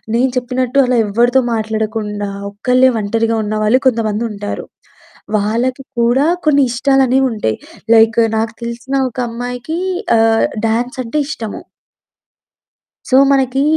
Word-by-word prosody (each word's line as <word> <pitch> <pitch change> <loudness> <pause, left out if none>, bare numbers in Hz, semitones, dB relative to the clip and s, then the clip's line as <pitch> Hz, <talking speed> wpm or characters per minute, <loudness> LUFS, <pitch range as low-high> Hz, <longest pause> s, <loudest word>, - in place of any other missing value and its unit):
నేను 255 +2 +2
చెప్పినట్టు 250 +1 -1
అలా 250 -1 +1
ఎవరితో 240 +5 +3
మాట్లాడకుండా 215 -2 -3 0.2
ఒక్కళ్ళే 250 +5 +3
వంటరిగా 225 +2 0
ఉన్నవాళ్లు 215 +4 +1
కొంతమంది 225 -2 0
ఉంటారు. 205 0 -5 0.7
వాళ్ళకి 240 +6 -1 0.2
కూడా 240 +4 +3 0.2
కొన్ని 285 -2 +4
ఇష్టాలు 270 +2 +2
అనేవి 265 +2 +2
ఉంటాయి 150 - -2 0.4
లైక్ 225 +1 +5 0.2
నాకు 225 +1 -1
తెలిసిన 235 +3 -4
ఒక 240 - -19
అమ్మాయికి 245 +6 -5 0.4
ఆహ్, 225 0 +3 0.2
డాన్స్ 245 +4 -1
అంటే 270 +6 -2
ఇష్టము. 225 -8 -6 1.5
సో 260 - +3 0.2
మనకి 270 -1 +1
235 Hz, 120 wpm, -16 LUFS, 220-255 Hz, 1.5 s, లైక్